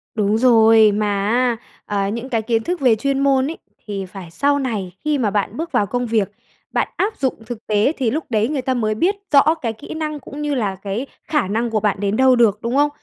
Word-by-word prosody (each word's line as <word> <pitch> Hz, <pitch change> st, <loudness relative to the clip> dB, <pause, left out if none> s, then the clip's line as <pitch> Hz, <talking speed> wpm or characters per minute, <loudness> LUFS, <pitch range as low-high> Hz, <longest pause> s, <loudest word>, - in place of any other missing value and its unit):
Đúng 210 Hz, 0 st, +1 dB
rồi, 225 Hz, -3 st, +6 dB
mà 210 Hz, +1 st, 0 dB, 0.2 s
á, 245 Hz, 0 st, +2 dB, 0.3 s
ờ, 200 Hz, -1 st, -1 dB
những 235 Hz, +5 st, -4 dB
cái 230 Hz, -3 st, 0 dB
kiến 225 Hz, 0 st, 0 dB
thức 355 Hz, +5 st, -2 dB
về 245 Hz, -4 st, +5 dB
chuyên 275 Hz, +4 st, -1 dB
môn 275 Hz, -1 st, +2 dB
ấy, 330 Hz, -, -8 dB, 0.3 s
thì 200 Hz, -2 st, -4 dB
phải 185 Hz, -2 st, -10 dB
sau 285 Hz, +9 st, +1 dB
này 215 Hz, -9 st, -3 dB
khi 300 Hz, -1 st, +1 dB
mà 235 Hz, -6 st, +1 dB
bạn 205 Hz, +2 st, -1 dB
bước 330 Hz, +1 st, -4 dB
vào 205 Hz, -, +2 dB
công 245 Hz, +4 st, -2 dB
việc, 220 Hz, -4 st, 0 dB, 0.4 s
bạn -, -, 0 dB
áp 420 Hz, +3 st, -1 dB
dụng 265 Hz, -2 st, 0 dB
thực 230 Hz, -1 st, -8 dB
tế 210 Hz, +5 st, +2 dB
thì 250 Hz, -5 st, 0 dB
lúc 310 Hz, +3 st, -2 dB
đấy 220 Hz, -1 st, +1 dB
người 285 Hz, -4 st, -1 dB
ta 260 Hz, 0 st, -1 dB
mới 215 Hz, -3 st, 0 dB
biết 360 Hz, -, +1 dB, 0.2 s
rõ 290 Hz, +2 st, +6 dB
cái 230 Hz, -3 st, -2 dB
kỹ 220 Hz, -, -9 dB
năng, 305 Hz, -1 st, -4 dB
cũng 285 Hz, +2 st, -9 dB
như 295 Hz, -1 st, -1 dB
là 205 Hz, -6 st, -1 dB
cái 200 Hz, +6 st, -4 dB, 0.2 s
khả 300 Hz, -11 st, 0 dB
năng 230 Hz, +4 st, -1 dB
của 220 Hz, -1 st, 0 dB
bạn 205 Hz, -2 st, 0 dB
đến 200 Hz, 0 st, 0 dB
đâu 260 Hz, -1 st, +5 dB
được, 215 Hz, -4 st, +3 dB
đúng 235 Hz, +2 st, -2 dB
không? 290 Hz, +1 st, +4 dB
230 Hz, 245 wpm, -20 LUFS, 210-275 Hz, 0.4 s, rồi